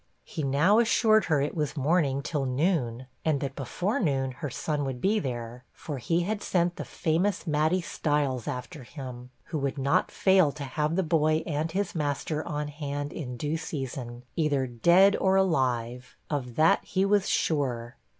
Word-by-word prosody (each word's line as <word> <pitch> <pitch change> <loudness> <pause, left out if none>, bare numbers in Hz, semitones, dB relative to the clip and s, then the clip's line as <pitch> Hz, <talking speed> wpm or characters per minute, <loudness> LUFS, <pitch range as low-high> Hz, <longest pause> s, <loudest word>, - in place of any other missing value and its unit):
He 180 -7 -6
now 150 +10 +3
assured 220 -3 +4
her 150 -4 +2
it 145 - -1
was 150 -1 -2
morning 140 -2 +1
till 145 -2 -2
noon; 130 -4 0 0.2
and 155 -3 +1
that 135 -1 -4
before 180 - -2
noon 135 -6 0
her 145 +3 -5
son 145 +3 -2
would 135 -2 -3
be 210 - +2
there, 120 - -5
for 145 -4 -6
he 165 +9 +1
had 205 +4 -2
sent 175 -1 0
the - - -5
famous 180 +4 0
'Matty 155 +3 +2
Styles' 145 -7 -1
after 125 +1 -5
him, 125 -2 -9 0.2
who 155 - 0
would 140 0 -2
not 140 +7 +2
fail 190 -6 +4
to 150 - -7
have 150 +4 -1
the 190 - +2
boy 155 -1 +2
and 155 0 -2
his 200 -1 -1
master 150 0 -2
on 150 -2 -3
hand 145 0 -4
in 125 -6 -5
due 150 +5 -1
season, 130 -6 -5
either 145 -5 +1
dead 170 - +5
or 190 0 +2
alive; 125 -9 0
of 125 -5 -3
that 160 +1 +4
he 190 +1 0
was 200 -1 +2
sure. 125 -7 0
150 Hz, 175 wpm, -27 LUFS, 130-170 Hz, 0.2 s, dead